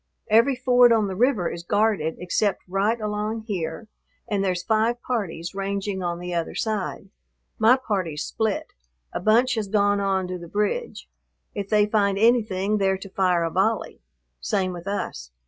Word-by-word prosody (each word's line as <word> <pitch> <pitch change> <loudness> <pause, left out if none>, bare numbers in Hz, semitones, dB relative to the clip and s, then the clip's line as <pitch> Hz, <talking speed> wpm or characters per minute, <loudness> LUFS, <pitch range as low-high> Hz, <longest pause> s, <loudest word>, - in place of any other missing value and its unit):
Every 235 +5 +5
ford 245 -1 +5
on 220 -2 +4
the 190 -2 -4
river 230 -5 +2
is 170 - -5
guarded 205 -4 +1
except 190 +2 -1
right 200 +5 0
along 210 +1 -2
here, 180 -1 -4 0.4
and 200 -2 0
there's 180 -2 -1
five 225 +3 +1
parties 180 -8 -3
ranging 195 0 -3
on 175 -1 -2
the 180 0 -5
other 170 -1 -2
side. 205 -3 -3 0.5
My 230 +4 +6
party's 185 - -2
split, 220 -2 -2 0.4
a - - -2
bunch 235 +6 +3
has 220 -4 -2
gone 205 0 +2
on 190 -2 0
to 180 0 -4
the 170 - -9
bridge. 210 - -2 0.5
If 200 -1 -5
they 210 -1 +4
find 205 -2 +1
anything 210 -3 +2
they're 190 -1 +2
to 195 +1 -10
fire 180 -3 +1
a 165 - -1
volley. 205 +5 0 0.4
Same 185 - -1
with 175 +2 -9
us. 65 - -4
200 Hz, 165 wpm, -24 LUFS, 185-220 Hz, 0.5 s, My